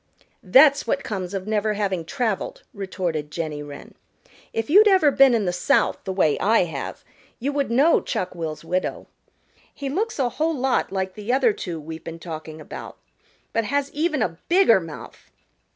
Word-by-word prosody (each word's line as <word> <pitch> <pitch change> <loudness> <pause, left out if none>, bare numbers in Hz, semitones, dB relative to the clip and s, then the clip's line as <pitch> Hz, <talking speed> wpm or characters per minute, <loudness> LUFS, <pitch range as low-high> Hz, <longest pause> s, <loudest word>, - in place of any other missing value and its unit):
"That's 280 +9 +5
what 275 - 0
comes 190 -2 -4
of 190 -1 -4
never 215 0 0
having 190 -5 -1
traveled," 235 - -2
retorted 180 -6 -3
Jenny 150 -1 -4
Wren. 145 -1 -10 0.6
"If 225 0 -2
you'd 415 +7 +7
ever 375 -8 +5
been 270 -3 +6
in 215 -3 0
the 180 - 0
South 180 - +2
the 190 - -2
way 185 -6 +2
I 220 -1 +4
have 150 -6 -6 0.3
you 280 +4 -2
would 280 -3 0
know 275 +8 +4
Chuck 180 - -3
will's 165 -2 -5
widow. 185 +2 -2 0.7
He 280 -2 -5
looks 425 +10 -2
a 260 -4 +1
whole 315 +4 -1
lot 265 0 0
like 190 -1 -2
the 210 +3 -4
other 255 -4 +3
two 170 -5 -5
we've 160 +1 -8
been 165 0 -7
talking 160 -2 -8
about, - - -9 0.6
but 230 -1 +1
has 280 +4 -1
even 305 -4 0
a 165 -4 -4
bigger 345 - +5
mouth. 165 -3 -10
205 Hz, 175 wpm, -23 LUFS, 170-275 Hz, 0.7 s, you'd